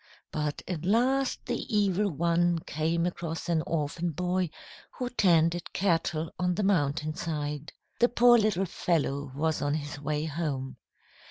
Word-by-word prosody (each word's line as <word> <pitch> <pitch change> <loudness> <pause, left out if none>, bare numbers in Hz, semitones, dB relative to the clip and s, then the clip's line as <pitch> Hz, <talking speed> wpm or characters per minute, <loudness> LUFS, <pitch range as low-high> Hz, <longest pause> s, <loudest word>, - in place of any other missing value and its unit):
But 150 -1 -2
at 170 -4 -3
last 250 +7 +1
the - - -2 0.2
Evil 200 0 +2
One 170 +1 +2
came 165 +2 0
across 170 -2 -4
an 165 -2 +2
orphan 165 +2 -1
boy 180 +2 -1 0.5
who 250 -1 -3
tended 175 -5 +2
cattle 165 -3 0
on 180 0 +1
the 210 - -1
mountainside. 155 -3 -1 0.3
The 240 - +5
poor 240 0 +6
little 205 -3 +1
fellow 145 -6 -1
was 155 0 0
on 145 0 +1
his 145 -1 -5
way 150 +1 -1
home. 145 -4 -3
165 Hz, 140 wpm, -29 LUFS, 150-185 Hz, 0.5 s, poor